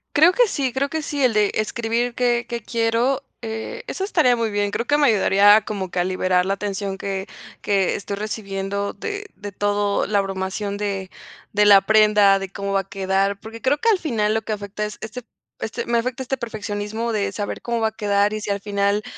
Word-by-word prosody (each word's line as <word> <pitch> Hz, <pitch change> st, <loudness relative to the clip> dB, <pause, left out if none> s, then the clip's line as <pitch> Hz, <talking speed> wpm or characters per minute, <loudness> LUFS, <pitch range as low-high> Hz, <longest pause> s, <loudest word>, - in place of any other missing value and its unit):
Creo 320 Hz, +5 st, +6 dB
que -, -, +4 dB
sí, 265 Hz, -8 st, -1 dB
creo 275 Hz, +2 st, 0 dB
que 320 Hz, +1 st, -2 dB
sí, 285 Hz, -2 st, -2 dB
el 245 Hz, -, +4 dB
de 210 Hz, -1 st, +3 dB
escribir 235 Hz, +2 st, -1 dB
que 240 Hz, -1 st, +1 dB
que 235 Hz, -1 st, -4 dB
quiero, 235 Hz, +4 st, 0 dB, 0.2 s
eh, 225 Hz, -, -5 dB
eso 385 Hz, -, -4 dB
estaría 310 Hz, -11 st, +3 dB
muy 230 Hz, -1 st, -1 dB
bien, 205 Hz, 0 st, -1 dB
creo 235 Hz, -, -2 dB
que 290 Hz, 0 st, +3 dB
me 290 Hz, -, +4 dB
ayudaría 205 Hz, -1 st, +5 dB
como 195 Hz, -4 st, -4 dB
que 180 Hz, -, -2 dB
a -, -, +3 dB
liberar 185 Hz, 0 st, +1 dB
la 195 Hz, +1 st, -1 dB
tensión 195 Hz, -1 st, -3 dB
que 195 Hz, -1 st, -4 dB, 0.3 s
que 195 Hz, -2 st, +1 dB
estoy 200 Hz, 0 st, -4 dB
recibiendo 200 Hz, -1 st, -3 dB
de 410 Hz, -, -5 dB
de 205 Hz, 0 st, -8 dB
todo 205 Hz, +1 st, 0 dB
la 205 Hz, 0 st, +1 dB
abrumación 195 Hz, +1 st, -3 dB
de 195 Hz, -2 st, -3 dB, 0.4 s
de 210 Hz, 0 st, +4 dB
la 200 Hz, -1 st, +8 dB
prenda 210 Hz, -1 st, +5 dB
de 195 Hz, -1 st, -5 dB
cómo 200 Hz, 0 st, -4 dB
va 195 Hz, -, +3 dB
a 195 Hz, -, -19 dB
quedar 195 Hz, +1 st, 0 dB
porque 225 Hz, +2 st, -10 dB
creo 275 Hz, +2 st, +2 dB
que 460 Hz, -, +1 dB
al 410 Hz, -5 st, +3 dB
final 215 Hz, -9 st, 0 dB
lo 220 Hz, -, 0 dB
que 215 Hz, -, -3 dB
afecta 205 Hz, +1 st, -4 dB
es 210 Hz, -, -7 dB
este 225 Hz, +3 st, -6 dB, 0.4 s
este 220 Hz, -, -4 dB
me 235 Hz, 0 st, +1 dB
afecta 255 Hz, +2 st, -3 dB
este 265 Hz, +1 st, -2 dB
perfeccionismo 220 Hz, 0 st, -4 dB
de 210 Hz, -2 st, 0 dB
saber 205 Hz, -1 st, -4 dB
cómo 235 Hz, -1 st, -2 dB
va 220 Hz, -, +2 dB
a -, -, -18 dB
quedar 205 Hz, -1 st, +1 dB
y 215 Hz, -, -3 dB
si 205 Hz, -, -5 dB
al 200 Hz, -, 0 dB
final 200 Hz, +1 st, 0 dB
210 Hz, 220 wpm, -22 LUFS, 200-235 Hz, 0.4 s, la